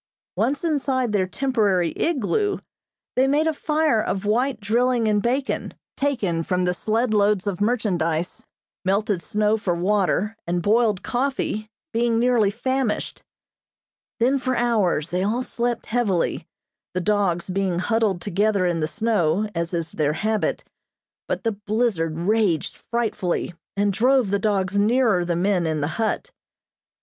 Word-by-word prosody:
Once 280 +3 0
inside 270 -6 0
their 195 -3 +1
temporary 205 -7 +1
igloo, 345 - 0 0.6
they 260 +1 +4
made 295 +3 +2
a 320 - +1
fire 305 -6 +1
of 195 -1 -2
white 240 +3 +1
drilling 235 +2 +1
and 210 -1 +2
bacon, 260 +5 -1 0.2
taken 225 -13 0
from 180 +2 0
the 180 - +1
sled 220 +5 0
loads 205 -2 +2
of 200 -2 -3
merchandise; 180 -7 -1 0.4
melted 195 -1 0
snow 210 +5 +1
for 185 -5 -1
water, 200 +3 +1
and 175 0 -1
boiled 215 -2 +2
coffee, 245 -4 -2 0.2
being 230 0 +2
nearly 235 -3 +3
famished. 255 +1 -2 1.0
Then 260 +4 +3
for 255 0 -1
hours 210 -10 +1
they 180 +1 -1
all 220 +6 0
slept 240 -1 -2
heavily, 220 -7 0 0.5
the - - +1
dogs 195 -4 +1
being 190 -2 -1
huddled 205 -1 +1
together 205 0 +1
in 175 -2 0
the 155 - 0
snow, 210 -2 +1
as 170 0 -2
is 165 -2 -3
their 150 -1 0
habit, 215 +6 -1 0.6
but - - -2
the 225 - +1
blizzard 205 -6 -1
raged 195 -2 +1
frightfully, 220 -7 -2 0.2
and 205 0 +2
drove 250 0 +3
the 200 - +2
dogs 200 -1 0
nearer 220 -3 +3
the 175 0 -1
men 180 -1 +1
in 155 -1 -1
the 145 - 0
hut. 225 - -1
210 Hz, 145 wpm, -23 LUFS, 185-240 Hz, 1.0 s, they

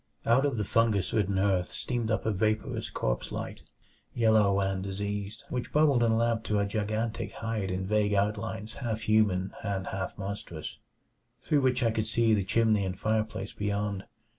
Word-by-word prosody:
Out 130 +5 +4
of 135 -5 -2
the 105 - 0
fungus 105 -7 +2
ridden 100 -3 +1
earth 95 -2 +2
steamed 120 -3 -2
up 110 - 0
a 110 - +2
vaporous 110 +2 -1
corpse - - -2
light, - - -5 0.5
yellow 110 -4 +4
and 95 -1 0
diseased, 100 +2 -4
which 125 -1 -3
bubbled 145 -5 +4
and 115 -1 +3
lapped 115 -1 +1
to 105 - +1
a 100 - +2
gigantic 110 +2 -2
height 110 -4 -3
in 95 0 -2
vague 105 0 +2
outlines 105 +1 -1
half 110 -2 -2
human 100 -4 +2
and 100 -3 -2
half 95 -1 -4
monstrous, 95 -5 -6 0.6
through 145 -2 +2
which 130 -1 +2
I 115 - +3
could 110 0 -1
see 115 0 +3
the 100 -2 +2
chimney 110 +1 +2
and 95 -1 -3
fireplace 110 -2 -1
beyond. 100 -1 -2
105 Hz, 170 wpm, -29 LUFS, 100-115 Hz, 0.6 s, Out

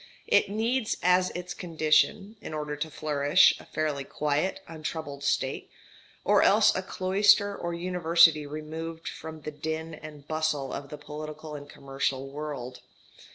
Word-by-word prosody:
It - - +3
needs 225 +3 0
as 180 0 +4
its 180 0 -5
condition, 165 +5 +1
in 155 - -6
order 150 -1 -3
to 155 +2 -4
flourish, 150 +2 +4
a - - -13
fairly 150 -3 -2
quiet, 150 +6 -1
untroubled 155 -3 -6
state, 135 -1 -1 0.5
or - - +4
else - - +5
a - - 0
cloister 200 +2 +3
or 170 0 -4
university 170 -3 +4
removed 160 +2 -6
from 160 0 -7
the 150 - -5
din 160 +2 -4
and 150 -2 -11
bustle 155 -4 -1
of 140 0 -6
the 150 - -7
political 155 +1 -8
and 145 -1 -8
commercial 135 0 -3
world. 140 -3 -6
155 Hz, 145 wpm, -28 LUFS, 145-170 Hz, 0.5 s, else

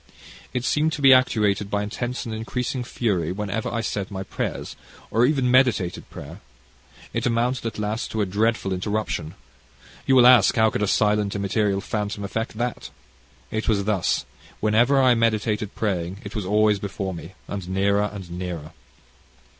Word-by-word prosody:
It 125 -1 -2
seemed 155 +3 +2
to 150 - -4
be 135 -1 +9
actuated 105 -5 +2
by 105 0 0
intense 120 +4 -4
and 115 - -4
increasing 125 +3 -3
fury, 100 -10 -1
whenever 105 +3 -3
I 115 - -1
said 100 -3 -3
my 95 -2 -5
prayers, - - -4 0.4
or 115 +3 +4
even 135 -4 +1
meditated 120 -9 +2
prayer. - - -9 0.7
It - - 0
amounted 120 +1 0
at 115 - -6
last 105 +1 -2
to 110 - -2
a - - +2
dreadful 105 0 0
interruption. 95 -4 -3 0.7
You 135 - +5
will 125 -2 +7
ask, 125 -4 +7
how 110 -2 +4
could - - -2
a 105 - +1
silent 105 0 +2
immaterial 100 0 0
phantom 105 0 -3
effect 110 +2 -4
that? 120 +1 -3 0.6
It 110 +1 -2
was 100 -3 +2
thus, 100 -3 0 0.3
whenever 120 +6 +3
I 130 -2 +5
meditated 110 -2 0
praying; 95 -2 -2
It 100 - -8
was 105 -4 -3
always 105 0 +3
before 95 -1 -4
me, 85 +2 -9
and 95 -3 -5
nearer 100 +2 +1
and 100 -3 -8
nearer. 85 -4 -5
105 Hz, 165 wpm, -24 LUFS, 100-115 Hz, 0.7 s, be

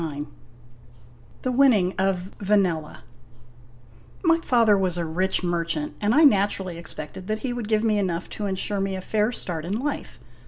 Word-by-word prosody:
M 145 -2 -5 1.1
THE 255 - 0
WINNING 240 -9 +4
OF 190 -1 0
VANELLA 185 - 0 1.2
Y 330 0 +5
father 230 -8 +4
was 185 -3 0
a 170 - -1
rich 185 +4 0
merchant, 165 -3 -1
and 210 +2 +2
I 315 - +6
naturally 195 - +2
expected 170 +2 -7
that 215 0 -3
he 245 - -1
would 240 -3 -4
give 215 0 +1
me 215 -2 +2
enough 175 -3 -2
to 210 - -4
insure 195 +1 -2
me 195 0 -1
a 190 - -5
fair 215 +4 0
start 170 -9 -4
in 190 +6 -2
life. 285 +2 -4
195 Hz, 165 wpm, -24 LUFS, 175-215 Hz, 1.2 s, I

